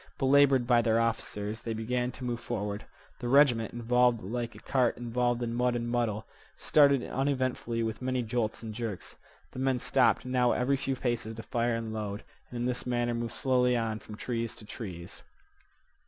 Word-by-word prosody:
Belabored 135 -2 +4
by 120 -1 +4
their 115 -1 +2
officers, 110 -1 -2
they 115 -1 -3
began 125 +3 -1
to 130 - -9
move 120 -1 -2
forward. 105 -4 -4 0.3
The 120 - -4
regiment, 125 -4 +4
involved 120 -1 +2
like 120 +3 -4
a - - -11
cart 125 +1 +1
involved 120 0 0
in 115 -1 -2
mud 125 0 +1
and 120 0 -2
muddle, 120 -3 -1 0.3
started 140 -4 +4
unevenly 130 -4 -1
with 110 +1 -3
many 130 -1 -1
jolts 115 -1 -2
and 110 -1 -5
jerks. 110 -4 -5 0.4
The - - -8
men 130 -1 +1
stopped 120 -3 +2
now 125 -1 +2
every 130 +3 +1
few 135 0 -2
paces 120 -3 -2
to 115 - -7
fire 120 +1 0
and 115 -1 -4
load, 105 -1 -4 0.3
and 120 - -7
in 120 - -1
this 125 0 -2
manner 120 -1 0
moved 115 0 -3
slowly 125 -1 +2
on 110 -2 -2
from 105 - -10
trees 115 -2 -3
to 110 - -11
trees. 90 -5 -8
120 Hz, 185 wpm, -29 LUFS, 115-125 Hz, 0.4 s, Belabored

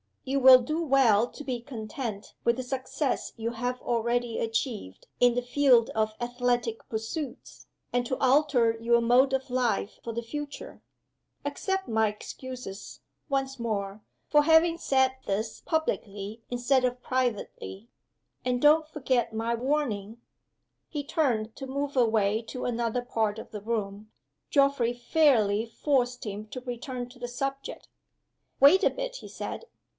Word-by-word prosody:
You 275 +1 0
will 260 -1 +9
do 310 +7 -2
well 250 -7 +4
to 295 - -10
be 250 -4 -3
content 220 -3 -6
with 235 - +3
the 255 - -3
success 260 +2 -2
you 230 +1 -2
have 245 +2 -3
already 235 0 0
achieved 225 - -3
in 245 -1 +5
the 245 - +1
field 245 -2 +4
of 215 0 0
athletic 240 -1 -1
pursuits, 235 +5 -5 0.3
and 245 0 +1
to 260 - -1
alter 260 -4 +3
your 235 +1 +3
mode 250 +3 +4
of 265 0 -1
life 245 -4 0
for 230 - -4
the 235 - -2
future. 295 - -7 0.6
Accept 385 -1 -2
my 220 -1 +2
excuses, 210 0 -8 0.3
once 270 -1 -1
more, 205 -3 -3 0.3
for 295 0 +5
having 325 +2 +5
said 265 -4 +2
this 215 +3 -2
publicly 215 - -2
instead 245 +2 +2
of 250 0 -2
privately 240 -4 -2 0.6
and 250 -1 0
don't 305 +1 +5
forget 260 -6 0
my 225 +1 -1
warning." 235 -4 -1 0.7
He 295 -2 -4
turned 235 -8 0
to 270 - -6
move 280 +1 -3
away 220 -3 +3
to 250 +3 -6
another 235 0 -1
part 220 -3 -1
of - - -9
the 210 - -6
room. 215 -1 -3 0.4
Geoffrey 275 -4 +3
fairly 240 -5 +3
forced 250 +1 0
him 210 +1 -5
to 255 +3 -7
return 245 0 -5
to 250 0 -16
the 245 - -4
subject. 275 +2 -5 0.7
"Wait 290 +8 +7
a - - +6
bit," - - -5
he - - -10
said. - - -6
245 Hz, 145 wpm, -28 LUFS, 225-270 Hz, 0.7 s, will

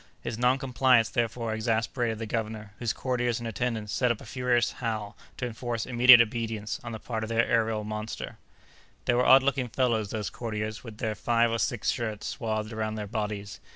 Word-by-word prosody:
His 120 -1 -3
noncompliance, 125 -1 +3
therefore, 115 -1 -1
exasperated 115 +1 0
the 115 - -4
governor, 110 -2 -4
whose 120 -2 0
courtiers 125 -2 -1
and 120 - -5
attendants 115 -2 -2
set 125 -2 +2
up 115 - -2
a - - -11
furious 125 -2 +1
howl 110 -4 -4 0.2
to - - -2
enforce 120 -1 -3
immediate 125 -1 +8
obedience 115 -1 -2
on 120 - -6
the 110 - -4
part 110 0 -4
of 110 - -4
the 115 - -2
aërial 115 -2 +2
monster. 110 +1 -5 0.7
They 125 - +3
were 125 +1 +3
odd 135 0 +8
looking 135 -2 +1
fellows 115 -4 0
those 105 -1 -3
courtiers, 110 -2 -4
with 110 -4 -9
their 110 0 -1
five 115 +2 +2
or 115 - -1
six 120 -1 0
shirts 110 -3 -4
swathed 110 -2 -3
around 110 0 -2
their 105 -1 -4
bodies! 105 -2 -4
115 Hz, 190 wpm, -28 LUFS, 110-120 Hz, 0.7 s, immediate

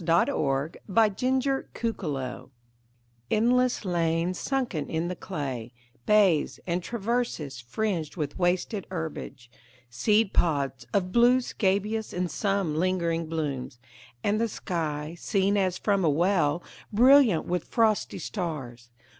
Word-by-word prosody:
Frederic 165 - +1
Manning 225 +5 +2
THE 270 +1 -1
TRENCHES 145 - -3 0.8
ENDLESS 245 +1 +2
lanes 170 0 0
sunken 250 - -2
in 165 +2 -1
the 180 - -3
clay, 130 -8 -5 0.3
Bays, 200 -8 +3
and 175 0 -1
traverses, 220 - -2
fringed 160 - -2
with 150 0 -3
wasted 185 +3 0
herbage, 160 -8 -6 0.4
Seed 210 - +2
pods 140 -6 0
of 185 -2 0
blue 240 +4 +5
scabious, 210 -1 -1
and 180 -2 -2
some 195 -3 0
lingering 170 -2 0
blooms; 145 -6 -3 0.5
And 210 +2 +1
the 230 - +1
sky, 155 -4 -3
seen 200 +1 +1
as 185 -3 +1
from 200 -1 +1
a 160 - +4
well, 170 0 +2 0.3
Brilliant 245 - +6
with 180 -1 -2
frosty 220 -3 +1
stars. 130 - -5
180 Hz, 120 wpm, -27 LUFS, 155-215 Hz, 0.8 s, Brilliant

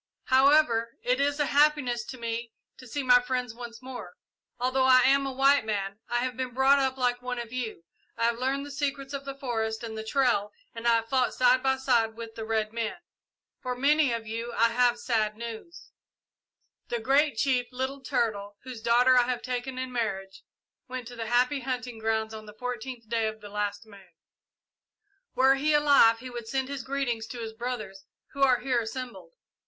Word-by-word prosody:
"However, 260 -4 +4
it 250 +2 +1
is 285 +1 +1
a 295 - +3
happiness 285 -5 +2
to 260 - -8
me 230 0 -4 0.3
to 255 - -13
see 285 +4 -3
my 245 -1 +6
friends 250 -2 -2
once 235 0 -9
more. 250 -9 -8 0.4
Although 255 +1 +1
I 255 -1 +7
am 275 +1 +3
a - - -3
white 275 +1 +4
man, 200 -2 -3
I 240 0 +1
have 255 -1 -3
been 255 -1 -4
brought 270 +2 +5
up 265 -1 0
like 245 -1 0
one 250 0 -4
of 235 0 -6
you. 230 -9 -4 0.3
I - - -2
have 235 0 +1
learned 270 +2 -1
the 290 - -9
secrets 275 -1 -3
of 280 0 -5
the 275 0 -5
forest 225 -4 -2
and 225 -1 -5
the 220 - -5
trail 220 -4 +1 0.2
and 230 +1 -4
I 235 - +6
have 225 0 -1
fought 255 -1 +1
side 255 0 +4
by 265 0 +1
side 235 -4 +1
with 230 -1 -8
the 225 -1 -6
red 220 -1 -1
men. 230 -1 -2 0.7
For 250 -1 -3
many 285 +1 +3
of 230 -1 -3
you 230 +2 -4
I 230 0 +3
have 245 +1 +2
sad 215 -4 -1
news. 235 +9 -9 1.0
The 240 - -1
Great 275 +2 +2
Chief, 250 -1 +1
Little 260 +2 -4
Turtle, 215 -6 -2
whose 250 -3 -8
daughter 245 +3 +4
I 245 -1 +4
have 250 -1 -2
taken 255 +1 -4
in 255 0 -4
marriage, 195 -5 -3 0.5
went 255 -2 -6
to 245 - -10
the 225 -1 -5
happy 250 +4 +2
hunting 250 -2 -4
grounds 220 0 -1
on 215 -1 -9
the 210 - -12
fourteenth 250 -1 -6
day 225 -1 0
of 220 0 -5
the 205 -1 -10
last 205 +1 -3
moon. 195 -4 -17 1.2
"Were 265 +1 +5
he 295 +3 +2
alive 280 -6 +6
he 255 +2 -9
would 240 -2 -7
send 265 +2 -2
his 280 -2 -4
greetings 255 -5 -2
to 245 - -7
his 225 -1 -5
brothers 220 -5 -5 0.3
who 280 - -6
are 255 -3 +4
here 250 -2 +1
assembled. 255 - -7
245 Hz, 200 wpm, -28 LUFS, 225-265 Hz, 1.2 s, I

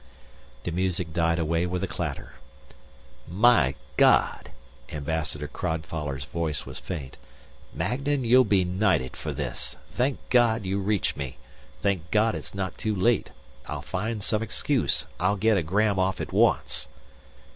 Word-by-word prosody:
The 85 - -2
music 90 -2 -1
died 85 0 +2
away 85 +1 +1
with 90 +1 -2
a - - 0
clatter. 80 -4 -5 0.6
" 70 0 -26 0.2
My 70 - +5 0.2
God," - - +4 0.4
Ambassador 75 -1 -3
Crodfoller's 80 -4 -3
voice 80 -1 -2
was - - -7
faint. 70 -7 -6 0.5
"Magnan, 135 - -1
you'll 125 +2 +6
be 100 -5 +3
knighted 90 -8 +1
for - - -4
this. - - -4 0.2
Thank 130 +2 0
God 115 -4 +4
you 95 +2 0
reached 100 -1 0
me. 65 -3 -5 0.5
Thank 90 -4 0
God 110 +1 +3
it's - - -6
not 95 -2 -3
too 110 -1 -1
late. 115 +4 +2 0.4
I'll - - -4
find 105 +3 -3
some 110 0 +1
excuse. 115 - 0
I'll 90 +3 +2
get 110 +2 +3
a 95 - +2
gram 100 +4 +1
off 95 -1 +1
at - - -5
once." - - +2
90 Hz, 145 wpm, -26 LUFS, 80-105 Hz, 0.6 s, you'll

